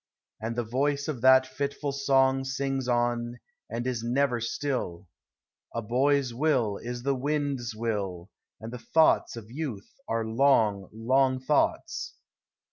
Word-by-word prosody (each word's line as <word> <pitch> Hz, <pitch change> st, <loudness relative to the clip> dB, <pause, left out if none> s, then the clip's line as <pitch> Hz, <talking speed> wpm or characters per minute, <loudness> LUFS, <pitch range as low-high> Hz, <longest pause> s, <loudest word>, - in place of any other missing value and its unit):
And 115 Hz, +1 st, -3 dB
the 120 Hz, -, 0 dB
voice 140 Hz, +5 st, 0 dB
of 140 Hz, -7 st, -3 dB
that 130 Hz, +1 st, +7 dB
fitful 140 Hz, +2 st, -3 dB
song 135 Hz, -1 st, +2 dB
Sings 135 Hz, -1 st, -2 dB
on, 120 Hz, 0 st, 0 dB, 0.3 s
and 120 Hz, -, -3 dB
is 125 Hz, -3 st, -1 dB
never 125 Hz, +1 st, +1 dB
still: 115 Hz, -, -3 dB, 0.3 s
" -, -, -27 dB
A 115 Hz, -, -2 dB
boy's 130 Hz, +3 st, +2 dB
will 125 Hz, -7 st, +1 dB
is 120 Hz, +1 st, -6 dB
the 140 Hz, +1 st, +1 dB
wind's 135 Hz, -4 st, -2 dB
will, 100 Hz, -5 st, -3 dB, 0.3 s
And 110 Hz, +2 st, -8 dB
the 125 Hz, -, -6 dB
thoughts 160 Hz, +1 st, +3 dB
of 115 Hz, -1 st, -10 dB
youth 130 Hz, -8 st, -5 dB, 0.2 s
are 115 Hz, -1 st, -1 dB
long, 110 Hz, -5 st, +2 dB
long 130 Hz, +4 st, +2 dB
thoughts." 140 Hz, +3 st, 0 dB
125 Hz, 140 wpm, -28 LUFS, 115-140 Hz, 0.3 s, that